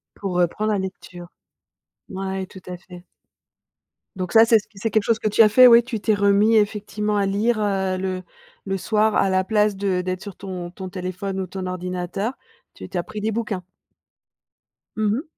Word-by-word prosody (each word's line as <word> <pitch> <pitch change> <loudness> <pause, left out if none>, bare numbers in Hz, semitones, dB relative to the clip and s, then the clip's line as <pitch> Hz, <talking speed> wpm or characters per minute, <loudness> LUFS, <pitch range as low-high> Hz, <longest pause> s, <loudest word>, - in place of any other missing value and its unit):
Pour 195 -2 -4
reprendre 180 +5 0
la 200 - 0
lecture. 185 -2 -7 0.8
Ouais, 190 0 -4
tout 190 0 -13
à 180 0 -6
fait. 180 -1 -14 1.1
Donc 185 -2 -4
ça, 225 0 +7
c'est 225 -1 +5
ce 205 - -15
q - - -43
c'est 225 +1 -2
quelque 215 -2 +2
chose 230 0 +2
que 215 - -1
tu 220 - +4
as 215 - +7
fait, 255 +4 +7
ouais, 235 0 +8
tu 235 -2 -5
t'es 215 +1 +1
remis 205 +2 +3
effectivement 210 0 0
à 200 - +2
lire, 215 +4 +1
heu, 190 -2 0
le 185 0 -3 0.4
le 195 0 -2
soir 215 +2 +1
à 195 - +3
la 185 0 +2
place 210 0 +1
de 190 -2 -1
d'être 185 0 -4
sur 200 -3 -8
ton 185 -3 -6
ton 185 0 -8
téléphone 185 +1 -5
ou 185 - -4
ton 185 +1 -6
ordinateur, 180 +4 -3 0.4
tu - - -9
tu 185 - -5
as 175 - -1
pris 210 +3 -7
des 220 +1 -1
bouquins? 215 -5 -3 1.3
Mmh 215 0 -1
mh. 290 - -4
195 Hz, 200 wpm, -22 LUFS, 185-215 Hz, 1.3 s, ouais